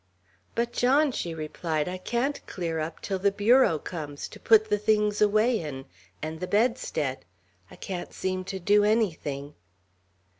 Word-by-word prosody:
"But, 235 Hz, +1 st, -1 dB
John," 275 Hz, +4 st, +3 dB
she 170 Hz, -8 st, -4 dB
replied, 155 Hz, 0 st, -2 dB
"I 185 Hz, +1 st, -4 dB
can't 240 Hz, +8 st, -1 dB
clear 165 Hz, -3 st, -3 dB
up 160 Hz, +1 st, -5 dB
till 195 Hz, -2 st, -2 dB
the 200 Hz, +1 st, +3 dB
bureau 210 Hz, -2 st, +4 dB
comes, 150 Hz, -2 st, -6 dB
to -, -, -12 dB
put 220 Hz, -1 st, +5 dB
the 210 Hz, -1 st, +1 dB
things 210 Hz, 0 st, +1 dB
away 215 Hz, +3 st, +3 dB
in, 135 Hz, -4 st, -6 dB, 0.4 s
and 160 Hz, +1 st, -4 dB
the 180 Hz, -, -4 dB
bedstead. 205 Hz, -, 0 dB, 0.5 s
I -, -, -13 dB
can't 180 Hz, -2 st, -6 dB
seem 185 Hz, 0 st, -2 dB
to 190 Hz, -, -4 dB
do 205 Hz, +3 st, +3 dB
anything." 160 Hz, -10 st, 0 dB
190 Hz, 155 wpm, -27 LUFS, 160-220 Hz, 0.5 s, put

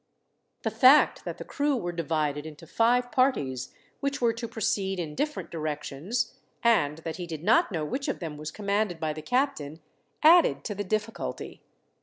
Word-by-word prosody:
The -, -, 0 dB
fact 270 Hz, +3 st, +5 dB
that -, -, -5 dB
the -, -, -8 dB
crew 290 Hz, -1 st, 0 dB
were 175 Hz, -6 st, -3 dB
divided 155 Hz, -3 st, -1 dB
into 155 Hz, +1 st, -11 dB
five 245 Hz, +7 st, +2 dB
parties, 140 Hz, -, +1 dB, 0.3 s
which 280 Hz, 0 st, -2 dB
were 235 Hz, -2 st, +2 dB
to 230 Hz, +1 st, -5 dB
proceed 195 Hz, -4 st, -1 dB
in 155 Hz, -3 st, -4 dB
different 300 Hz, -, -3 dB
directions, 155 Hz, -, -3 dB, 0.3 s
and 160 Hz, -11 st, +3 dB
that 165 Hz, -1 st, -4 dB
he 175 Hz, -, -5 dB
did 160 Hz, -2 st, -6 dB
not 335 Hz, -, +4 dB
know 160 Hz, -4 st, -2 dB
which 270 Hz, -, -3 dB
of -, -, -1 dB
them 160 Hz, -4 st, -6 dB
was 150 Hz, +1 st, -6 dB
commanded 200 Hz, -2 st, -1 dB
by 155 Hz, -1 st, -1 dB
the 155 Hz, -, -7 dB
captain, 165 Hz, -, -1 dB, 0.4 s
added 335 Hz, +2 st, +6 dB
to 210 Hz, -, -3 dB
the 205 Hz, 0 st, -3 dB
difficulty. 215 Hz, +3 st, -4 dB
195 Hz, 175 wpm, -27 LUFS, 155-245 Hz, 0.4 s, added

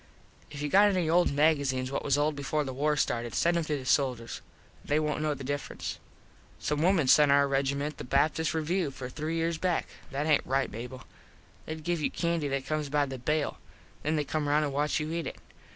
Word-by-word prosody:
If 145 Hz, -1 st, -6 dB
you -, -, 0 dB
got 200 Hz, +7 st, +6 dB
any 185 Hz, -4 st, +1 dB
old 175 Hz, +2 st, +3 dB
magazenes 140 Hz, -3 st, +2 dB
what 140 Hz, -, -2 dB
was 140 Hz, 0 st, +2 dB
old 150 Hz, +1 st, +1 dB
before 145 Hz, +2 st, -1 dB
the 135 Hz, -2 st, -5 dB
war 150 Hz, +3 st, +1 dB
started 120 Hz, -4 st, -1 dB
send 170 Hz, +1 st, +2 dB
em 170 Hz, -, +1 dB
to 150 Hz, -1 st, -1 dB
the 130 Hz, -, -8 dB
soldiers. 125 Hz, -3 st, 0 dB, 0.4 s
They 150 Hz, +1 st, +1 dB
wont 150 Hz, -1 st, -1 dB
know 155 Hz, -1 st, 0 dB
the 140 Hz, -, -8 dB
difference. 145 Hz, +2 st, -4 dB, 0.6 s
Some 150 Hz, 0 st, -1 dB
wimen 170 Hz, -5 st, +3 dB
sent 145 Hz, +2 st, +6 dB
our 140 Hz, 0 st, +5 dB
regiment 140 Hz, +2 st, -1 dB
the -, -, -5 dB
Baptist 155 Hz, +5 st, +1 dB
Review 165 Hz, +1 st, 0 dB
for 130 Hz, -2 st, -7 dB
three 155 Hz, +4 st, -3 dB
years 165 Hz, 0 st, -1 dB
back. 180 Hz, -2 st, 0 dB, 0.2 s
That 145 Hz, +2 st, -2 dB
aint 155 Hz, -2 st, +4 dB
right, 135 Hz, +1 st, 0 dB
Mable. 125 Hz, +4 st, -7 dB, 0.6 s
They 155 Hz, -, -3 dB
give 165 Hz, +1 st, -2 dB
you -, -, +1 dB
candy 170 Hz, -3 st, -1 dB
that 135 Hz, -1 st, -2 dB
comes 155 Hz, -1 st, -2 dB
by 145 Hz, 0 st, +2 dB
the 135 Hz, -2 st, -6 dB
bale. 150 Hz, +4 st, -1 dB, 0.4 s
Then 155 Hz, +1 st, 0 dB
they 150 Hz, -, +1 dB
come 150 Hz, +1 st, -2 dB
round 150 Hz, +1 st, +3 dB
an 145 Hz, -, -2 dB
watch 150 Hz, +3 st, 0 dB
you 155 Hz, +1 st, -3 dB
eat 170 Hz, 0 st, -2 dB
it. -, -, -5 dB
150 Hz, 215 wpm, -29 LUFS, 140-155 Hz, 0.6 s, got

